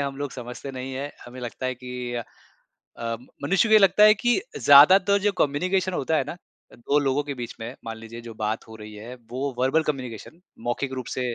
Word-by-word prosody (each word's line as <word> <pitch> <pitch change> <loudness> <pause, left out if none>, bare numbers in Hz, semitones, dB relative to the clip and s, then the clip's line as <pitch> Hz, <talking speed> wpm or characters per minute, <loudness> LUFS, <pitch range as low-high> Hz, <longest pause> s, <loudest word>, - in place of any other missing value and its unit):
हम 140 -1 -3
लोग 145 -1 -4
समझते 125 +2 -7
नहीं 130 0 -6
हैं, 140 +2 -4
हमें 125 +1 -10
लगता 125 +1 -5
है 130 - -1
कि 125 -1 -6
अ, 120 - -2 0.8
अ, 115 0 -2 0.3
मनुष्य 195 +9 +3
को - - +1
ये 215 - +9
लगता 195 +2 +6
है 215 0 +8
कि 240 - +1 0.2
ज़्यादातर 185 +8 +7
जो 205 +1 +2
कम्युनिकेशन 185 +6 +1
होता 160 +1 0
है - - +1
ना - - -4 0.4
अ, - - -15
2 140 +5 +1
लोगों 140 0 +1
के 140 -1 -4
बीच 120 -2 -6
में 115 +3 -6
मान 115 0 -5
लीजिए 115 +1 -9
जो 115 -1 -9
बात 110 +1 -3
हो 110 - -10
रही 105 -1 -10
है, 115 +4 -9 0.2
वो 135 +2 -3
वर्बल 130 +5 +2
कम्युनिकेशन 135 +2 -5 0.3
मौखिक 130 +3 -2
रूप 130 -2 -5
से 125 -2 -1
130 Hz, 220 wpm, -25 LUFS, 120-150 Hz, 0.8 s, ये